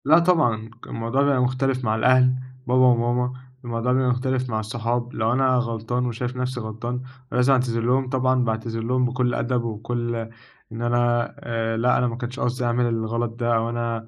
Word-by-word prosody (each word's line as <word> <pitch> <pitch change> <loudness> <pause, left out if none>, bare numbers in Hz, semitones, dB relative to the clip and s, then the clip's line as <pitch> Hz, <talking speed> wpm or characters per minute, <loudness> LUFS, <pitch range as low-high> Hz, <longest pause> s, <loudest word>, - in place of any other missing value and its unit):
لا 155 +4 +7
طبعًا، 125 -11 +2 0.2
الموضوع 115 +4 -1
بيبقى 140 -2 +3
مختلف 130 +1 0
مع 110 0 +1
الأهل، 130 +2 +4 0.3
بابا 125 +1 +3
وماما، 125 +1 +2 0.3
الموضوع 120 +1 -1
بيبقى 130 0 +2
مختلف 130 +1 0
مع 110 -1 -1
الصحاب، 120 +2 -2
لو 110 +1 +1
أنا 130 0 +3
غلطان 120 0 -1
وشايف 125 +1 -3
نفْسي 125 0 -2
غلطان، 120 +3 -4 0.3
لازم 125 +2 +3
أعتذر 120 -3 +1
لهم 125 +2 +1
طبعًا 130 -1 +2
باعتذر 115 0 -2
لهم 125 +2 +1
بكلّ 125 0 0
أدب 120 0 0
وبكلّ 120 +1 -3 0.6
إن 115 +1 -6
أنا 120 0 +1
آآ 115 -1 -2
لأ 125 +2 +3
أنا 125 - +2
ما 115 - -3
كانش 125 +1 -6
قصدي 125 0 -1
أعمل 120 +1 +1
الغلط 115 0 -1
ده، 120 -1 +1
أو 115 +1 +1
أنا 115 -1 -3
120 Hz, 180 wpm, -23 LUFS, 115-125 Hz, 0.6 s, لا